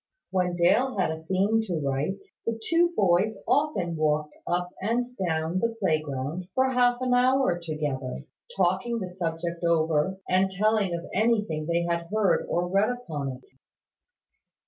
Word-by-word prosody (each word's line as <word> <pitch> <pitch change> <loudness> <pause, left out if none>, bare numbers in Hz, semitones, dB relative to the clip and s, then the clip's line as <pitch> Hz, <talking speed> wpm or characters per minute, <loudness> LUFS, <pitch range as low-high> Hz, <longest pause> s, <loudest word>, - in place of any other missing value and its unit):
When 180 -2 0
Dale 215 +8 +3
had 185 -4 +1
a 160 0 -5
theme 195 +5 +2
to 180 - -1
write, 140 - -2 0.2
the 230 0 -1
two 335 +8 +2
boys 195 +2 +2
often 280 - +1
walked 150 -1 0
up 180 0 -1
and 240 +4 -1
down 160 +2 0
the 230 +1 -1
playground 155 -1 -1
for 260 0 +3
half 245 -1 +3
an 255 -1 +1
hour 255 -6 +3
together, 145 - -4 0.3
talking 190 +6 +1
the 185 -5 -5
subject 170 -1 -4
over, 165 +1 +2
and 185 +1 +3
telling 200 -1 +1
of 170 - -6
anything 205 -8 +1
they 170 0 +1
had 170 0 -1
heard 215 -3 +2
or 175 +1 0
read 195 +3 +2
upon 155 - -4
it. - - -24
180 Hz, 150 wpm, -27 LUFS, 160-220 Hz, 0.3 s, Dale